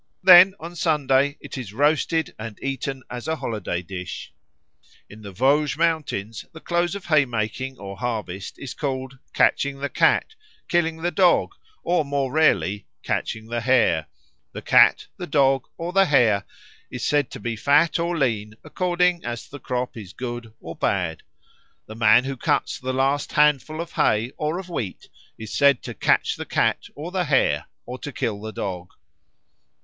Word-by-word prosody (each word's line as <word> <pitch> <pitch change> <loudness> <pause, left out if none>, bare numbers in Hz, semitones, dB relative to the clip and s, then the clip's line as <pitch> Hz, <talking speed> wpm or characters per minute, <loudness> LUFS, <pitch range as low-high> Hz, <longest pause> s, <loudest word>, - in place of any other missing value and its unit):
Then 185 +1 +9
on 170 +1 -8
Sunday 145 -4 +1
it 140 -2 -7
is 110 -6 -8
roasted 155 +4 +1
and 110 -1 -7
eaten 135 -1 -3
as 120 -1 -7
a 160 - 0
holiday 110 - -4
dish. 90 0 -7 0.7
In 110 +1 -13
the 100 -2 -9
Vosges 140 +8 +2
Mountains 150 -11 -1
the 160 - -10
close 175 +2 -1
of 200 - -7
haymaking 130 -3 0
or 100 -1 -8
harvest 105 -5 -4
is 140 - -7
called 130 -2 -4
"catching 140 0 +2
the 140 +1 -3
cat," - - +2 0.3
"killing 165 -1 0
the 175 - +1
dog," 180 -2 +3 0.3
or 175 -2 +1
more 140 -2 -2
rarely 115 -9 +2 0.2
"catching 110 0 -3
the 120 +1 -3
hare." 115 -11 +2 0.5
The - - -7
cat, - - +5
the - - -6
dog, 135 -2 +2
or 170 +2 -5
the 195 0 +5
hare 115 - +3 0.4
is 125 - -5
said 145 -3 +1
to - - -9
be 120 -1 -3
fat 145 +9 +3
or 170 0 -1
lean 110 -6 -1
according 180 -1 0
as 120 0 -5
the 145 - -10
crop 125 0 -3
is 100 -6 -9
good 120 -2 -6
or 85 0 -8
bad. 90 -5 -1 0.6
The 110 - -10
man 115 +2 +5
who 135 0 -4
cuts - - 0
the 130 +1 -3
last 135 +2 0
handful 150 +1 +2
of 170 0 -5
hay 120 -6 +1
or 155 +3 -2
of 185 -1 -7
wheat 120 - -5 0.3
is 110 -1 -8
said 140 -3 +4
to - - -6
catch - - +1
the - - -5
cat - - +1
or 155 +5 -7
the 185 -1 -1
hare 130 - +2 0.2
or 125 +1 -7
to 145 - -6
kill 105 -5 -3
the 110 0 -6
dog. 90 -4 -5
135 Hz, 170 wpm, -23 LUFS, 110-155 Hz, 0.7 s, Then